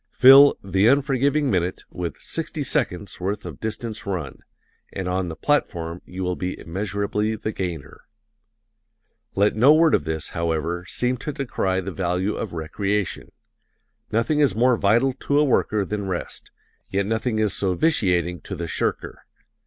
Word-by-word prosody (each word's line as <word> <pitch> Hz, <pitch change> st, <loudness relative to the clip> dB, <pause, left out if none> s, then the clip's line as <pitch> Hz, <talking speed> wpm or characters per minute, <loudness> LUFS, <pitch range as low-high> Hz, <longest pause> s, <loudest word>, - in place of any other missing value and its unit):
Fill 135 Hz, +2 st, +8 dB
"the 95 Hz, +1 st, +2 dB
unforgiving 140 Hz, +1 st, +2 dB
minute" 90 Hz, -1 st, -1 dB
with 90 Hz, -2 st, -5 dB
"sixty 160 Hz, -2 st, -3 dB
seconds' 100 Hz, -6 st, -1 dB
worth 100 Hz, +3 st, -3 dB
of 85 Hz, -6 st, -8 dB
distance 110 Hz, -1 st, -5 dB
run" 90 Hz, -8 st, -4 dB, 0.5 s
and 95 Hz, -, -4 dB
on 90 Hz, 0 st, -1 dB
the 80 Hz, -, -5 dB
platform 85 Hz, -, -1 dB
you 95 Hz, +1 st, -6 dB
will 90 Hz, 0 st, -1 dB
be 90 Hz, +1 st, -4 dB
immeasurably 100 Hz, +4 st, -2 dB
the 110 Hz, 0 st, -4 dB
gainer. 90 Hz, -8 st, -6 dB, 1.3 s
Let 100 Hz, +2 st, +2 dB
no 130 Hz, +8 st, +6 dB
word 160 Hz, 0 st, +4 dB
of -, -, +3 dB
this, 80 Hz, -1 st, -3 dB
however, 85 Hz, +1 st, -2 dB
seem 125 Hz, +5 st, -1 dB
to 150 Hz, -, -5 dB
decry 95 Hz, -9 st, -1 dB
the -, -, -5 dB
value 95 Hz, +2 st, -1 dB
of 110 Hz, -, -4 dB
recreation. 95 Hz, +5 st, -2 dB, 0.8 s
Nothing 115 Hz, +7 st, +1 dB
is 140 Hz, -10 st, +3 dB
more 125 Hz, +2 st, +4 dB
vital 115 Hz, +6 st, +2 dB
to 140 Hz, +2 st, -1 dB
a 150 Hz, -, +5 dB
worker 110 Hz, -6 st, +1 dB
than 100 Hz, +1 st, -4 dB
rest 90 Hz, -2 st, -5 dB, 0.4 s
yet 100 Hz, +1 st, 0 dB
nothing 110 Hz, +2 st, -1 dB
is 110 Hz, -2 st, +1 dB
so 95 Hz, -2 st, 0 dB
vitiating 90 Hz, -, +1 dB
to 95 Hz, -, -7 dB
the 85 Hz, -1 st, -4 dB
shirker. -, -, -3 dB
100 Hz, 155 wpm, -23 LUFS, 90-125 Hz, 1.3 s, Fill